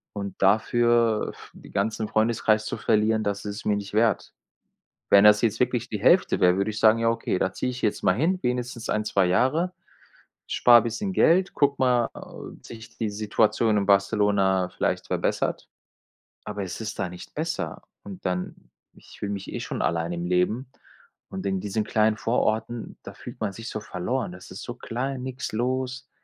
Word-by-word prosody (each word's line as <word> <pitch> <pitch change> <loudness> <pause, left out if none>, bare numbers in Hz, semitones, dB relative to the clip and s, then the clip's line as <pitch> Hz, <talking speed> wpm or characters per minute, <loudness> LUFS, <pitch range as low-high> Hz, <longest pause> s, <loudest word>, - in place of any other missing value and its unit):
Und 100 -1 -5
dafür 115 +2 +3
f - - -14
den - - -14
ganzen 110 +2 -1
Freundeskreis 110 0 +1
zu - - -4
verlieren, 110 +1 +2
das 100 0 -3
ist 100 -1 -4
es - - -9
mir 105 - +2
nicht 100 -1 -6
wert. 110 +1 +1 0.8
Wenn 100 - +7
das 105 0 +7
jetzt 115 -1 +1
wirklich 125 -1 0
die 105 -3 -4
Hälfte 175 - +4
wäre, 90 0 +5
würde 100 +2 0
ich 110 - -5
sagen: 110 0 +5
„Ja, 115 0 +2
okay, 115 -5 -1
da 95 - 0
ziehe 125 - -2
ich 125 0 -7
jetzt 105 - 0
mal 90 - +3
hin, 170 - +1
wenigstens 125 -1 -3
1, 105 0 0
2 100 -3 +2
Jahre, 140 - +1 0.8
spare 120 -2 +6
bisschen 120 - -3
Geld, 185 +1 +3
gucke 140 -1 +2
mal, 125 -2 +2
ob - - -11
sich 110 -1 -11
die 110 -2 -1
Situation 110 +1 +1
in 100 - -1
Barcelona 100 -2 +2
vielleicht - - -1
verbessert.” - - -1 0.8
Aber 100 - -4
es 90 - -6
ist 110 0 -5
da 95 - -1
nicht 90 0 -11
besser - - -3 0.2
und 100 -2 -10
dann 90 0 -2 0.4
ich - - -17
fühle 100 - -3
mich 100 -1 -6
eh - - -3
schon - - -4
alleine 85 +1 -1
im 85 0 -4
Leben 90 +8 0 0.6
und 95 - -6
in 95 -1 0
diesen 105 +1 -1
kleinen 110 0 +2
Vororten, 115 0 -1
da - - -9
fühlt - - -10
man 105 -2 -1
sich 115 +3 -7
so 110 - -4
verloren 115 +4 -3
das 90 0 -12
ist 90 - -8
so 120 - -5
klein, 130 +2 -4
nix 130 0 -5
los, 130 +3 -2
110 Hz, 190 wpm, -25 LUFS, 100-120 Hz, 0.8 s, Wenn